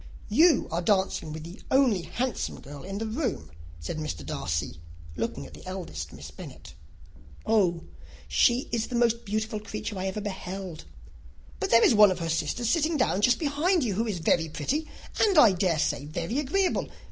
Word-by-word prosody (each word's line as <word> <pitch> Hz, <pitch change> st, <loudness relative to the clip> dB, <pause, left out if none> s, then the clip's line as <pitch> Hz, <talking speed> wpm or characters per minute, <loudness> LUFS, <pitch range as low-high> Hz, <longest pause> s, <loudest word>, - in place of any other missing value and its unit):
"You 335 Hz, 0 st, +5 dB
are 170 Hz, +2 st, 0 dB
dancing 190 Hz, -4 st, +1 dB
with 155 Hz, 0 st, -6 dB
the 170 Hz, +6 st, -10 dB
only 260 Hz, -8 st, +3 dB
handsome 245 Hz, +7 st, -3 dB
girl 140 Hz, 0 st, -10 dB
in 195 Hz, +2 st, -6 dB
the 225 Hz, -, -3 dB
room," 220 Hz, -, -3 dB, 0.3 s
said 80 Hz, -, -5 dB
Mr. 80 Hz, -, -5 dB
Darcy, 80 Hz, +1 st, -3 dB, 0.3 s
looking 70 Hz, -, -3 dB
at -, -, -13 dB
the -, -, -12 dB
eldest 180 Hz, -, -6 dB
Miss -, -, -10 dB
Bennet. -, -, -11 dB, 0.7 s
"Oh, 185 Hz, -6 st, +2 dB, 0.4 s
she 245 Hz, +1 st, +3 dB
is 230 Hz, -1 st, -1 dB
the 250 Hz, -, -5 dB
most 235 Hz, 0 st, +2 dB
beautiful 215 Hz, +1 st, -2 dB
creature 210 Hz, -1 st, -5 dB
I 190 Hz, -, -2 dB
ever 190 Hz, +2 st, -3 dB
beheld! 190 Hz, -4 st, -6 dB, 0.7 s
But 390 Hz, -, -1 dB
there 230 Hz, -, +6 dB
is -, -, +5 dB
one 210 Hz, -1 st, +8 dB
of 185 Hz, -, -1 dB
her 165 Hz, -2 st, -3 dB
sisters 165 Hz, +9 st, -1 dB
sitting 320 Hz, +3 st, +2 dB
down 225 Hz, -7 st, +1 dB
just 245 Hz, +3 st, +4 dB
behind 315 Hz, +3 st, +1 dB
you, 220 Hz, -5 st, 0 dB
who 225 Hz, +5 st, -1 dB
is 205 Hz, -4 st, -2 dB
very 165 Hz, 0 st, +1 dB
pretty, 275 Hz, -, -2 dB, 0.3 s
and 405 Hz, -5 st, +4 dB
I 235 Hz, -8 st, +8 dB
dare 180 Hz, -3 st, +1 dB
say 145 Hz, -2 st, 0 dB
very 170 Hz, -, -3 dB
agreeable. 360 Hz, +7 st, 0 dB
205 Hz, 180 wpm, -27 LUFS, 165-245 Hz, 0.7 s, one